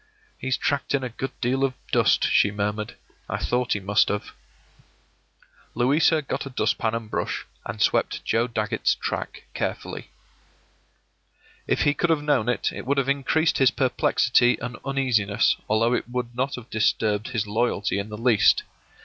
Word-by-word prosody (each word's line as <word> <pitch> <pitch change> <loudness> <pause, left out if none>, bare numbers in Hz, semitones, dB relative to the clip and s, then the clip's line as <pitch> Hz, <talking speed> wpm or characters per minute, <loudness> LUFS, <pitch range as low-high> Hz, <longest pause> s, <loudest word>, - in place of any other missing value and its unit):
“He's 130 0 -1
tracked 140 0 0
in 135 - -1
a 125 - -3
good 135 +3 -4
deal 130 +2 +1
of 130 -2 0 0.2
dust,” - - +3
she 100 - +4
murmured. 105 +1 -3 0.3
“I - - -1
thought 125 0 0
he 105 - -2
must 100 +2 +2
have.” 105 0 -3 1.4
Louisa 150 +6 +3
got 140 - -4
a - - -6
dust 115 -3 0
pan 115 0 0
and 115 -1 -4
brush, - - -3 0.2
and 100 +2 -6
swept - - +1
Joe 115 +2 +1
Dagget's 110 -1 0
track - - -4
carefully. - - -4 1.6
If - - +1
he 145 - +3
could 170 +3 0
have 155 -3 +2
known 135 -6 +1
it, 125 - 0
it - - -7
would 140 +1 +1
have 135 -1 +1
increased 140 +4 +1
his 135 -2 +6
perplexity 125 -1 +2
and 125 0 -5
uneasiness, 125 -7 +1
although 115 +3 +2
it 125 - -2
would 120 -1 -3
not 130 +3 -1
have 125 -1 -11
disturbed 110 -1 +1
his 115 -4 -2
loyalty 105 -2 0
in 100 +2 -5
the 105 - -6
least. 115 -2 +4
120 Hz, 165 wpm, -24 LUFS, 110-135 Hz, 1.6 s, his